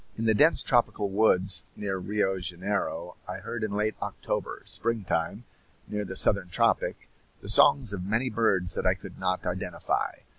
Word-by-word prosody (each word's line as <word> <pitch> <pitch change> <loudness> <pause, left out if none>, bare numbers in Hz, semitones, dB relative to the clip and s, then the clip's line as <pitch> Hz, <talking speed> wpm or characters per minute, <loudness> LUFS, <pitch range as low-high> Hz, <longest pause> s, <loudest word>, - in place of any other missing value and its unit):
In 115 - -2
the 110 - +4
dense 150 +10 +4
tropical 115 -6 +1
woods 95 -2 +3
near 95 -2 -3
Rio 95 0 -1
Janeiro 90 -1 -3
I - - -5
heard 120 -2 -6
in 110 - -1
late 105 +2 -1
October - - -4
springtime, 105 -3 -1 0.4
near 105 0 -3
the 95 - -7
southern 95 -2 +3
tropic 90 - 0 0.3
the - - -4
songs 120 -7 +6
of 90 -3 -4
many 110 +7 -1
birds 95 -6 +1
that - - -1
I - - +3
could - - -12
not 95 0 -2
identify. - - -2
100 Hz, 160 wpm, -27 LUFS, 90-110 Hz, 0.4 s, songs